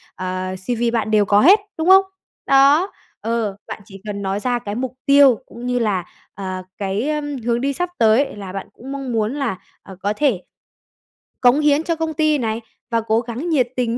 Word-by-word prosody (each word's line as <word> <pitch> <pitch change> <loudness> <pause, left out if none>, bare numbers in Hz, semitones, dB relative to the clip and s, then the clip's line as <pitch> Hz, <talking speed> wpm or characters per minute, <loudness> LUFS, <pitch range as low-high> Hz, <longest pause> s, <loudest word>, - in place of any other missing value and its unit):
ờ, 185 0 -4
CV 235 +5 -1
bạn 220 -2 -1
đều 210 -1 +4
có 205 +1 +4
hết, 390 - +7 0.2
đúng 320 +2 0
không? 385 +1 +8 0.4
Đó, 280 +7 +4 0.3
ờ, 225 -3 -2
bạn - - -7
chỉ 195 0 -13
cần 200 -1 -4
nói 195 0 -2
ra 245 +2 -1
cái 205 -2 -5
mục 255 +1 -3
tiêu 280 -5 +6
cũng 235 +1 -10
như 250 0 0
là, 200 -6 0 0.3
ờ, 185 -1 -5
cái, 200 +7 -2
ờm, 295 -2 -2
hướng 235 0 +1
đi 280 +1 0
sắp 355 +6 -2
tới 230 +4 +3
là 195 -3 -7
bạn 195 - -5
cũng 265 +3 -10
mong 275 -2 -4
muốn 225 0 0
là, 275 -9 -2 0.3
à, 190 - -11
có 205 +1 0
thể 250 -7 +1 1.0
cống 250 +3 +5
hiến 300 0 +3
cho 335 0 -1
công 320 0 -2
ty 310 0 +2
này 225 -3 -2 0.3
và 230 0 +2
cố 225 +1 +1
gắng 245 +8 -5
nhiệt 270 -7 +2
tình 240 -2 -1
235 Hz, 205 wpm, -20 LUFS, 205-280 Hz, 1.0 s, không